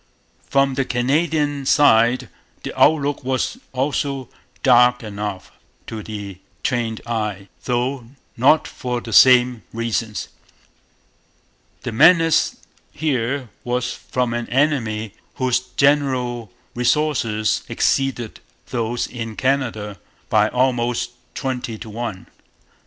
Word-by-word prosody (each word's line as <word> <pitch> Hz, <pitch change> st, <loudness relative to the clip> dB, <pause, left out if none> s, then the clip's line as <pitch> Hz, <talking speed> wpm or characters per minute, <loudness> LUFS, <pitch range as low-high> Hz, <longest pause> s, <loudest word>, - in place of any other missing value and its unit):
From 135 Hz, -1 st, +3 dB
the 135 Hz, +1 st, 0 dB
Canadian 145 Hz, +3 st, 0 dB
side 125 Hz, -3 st, +4 dB, 0.4 s
the -, -, -5 dB
outlook 145 Hz, -2 st, +3 dB
was 130 Hz, -, -1 dB
also 135 Hz, 0 st, -2 dB, 0.3 s
dark 125 Hz, -1 st, +5 dB
enough 105 Hz, -2 st, -5 dB, 0.3 s
to 110 Hz, -1 st, -6 dB
the 100 Hz, -3 st, -7 dB, 0.2 s
trained 115 Hz, -4 st, -1 dB
eye; 105 Hz, -4 st, -3 dB, 0.2 s
though 125 Hz, 0 st, -1 dB, 0.3 s
not 140 Hz, +6 st, +4 dB
for 125 Hz, -2 st, -4 dB
the 115 Hz, -2 st, -7 dB
same 125 Hz, 0 st, +6 dB
reasons. 115 Hz, -1 st, -3 dB, 1.5 s
The 120 Hz, -, -3 dB
menace 165 Hz, +7 st, +5 dB, 0.4 s
here 135 Hz, -3 st, -1 dB
was 125 Hz, 0 st, -1 dB
from 125 Hz, -2 st, -2 dB
an 120 Hz, 0 st, -3 dB
enemy 115 Hz, -7 st, 0 dB, 0.2 s
whose 130 Hz, -1 st, +1 dB
general 125 Hz, -4 st, 0 dB, 0.2 s
resources 120 Hz, -5 st, +1 dB
exceeded 130 Hz, -4 st, 0 dB, 0.3 s
those 120 Hz, 0 st, -1 dB
in 115 Hz, -3 st, -6 dB
Canada 115 Hz, -7 st, -1 dB, 0.3 s
by -, -, +3 dB
almost 125 Hz, -1 st, 0 dB, 0.2 s
twenty 125 Hz, -4 st, -3 dB
to 110 Hz, -, -9 dB
one. 110 Hz, -4 st, -5 dB
125 Hz, 100 wpm, -21 LUFS, 115-135 Hz, 1.5 s, same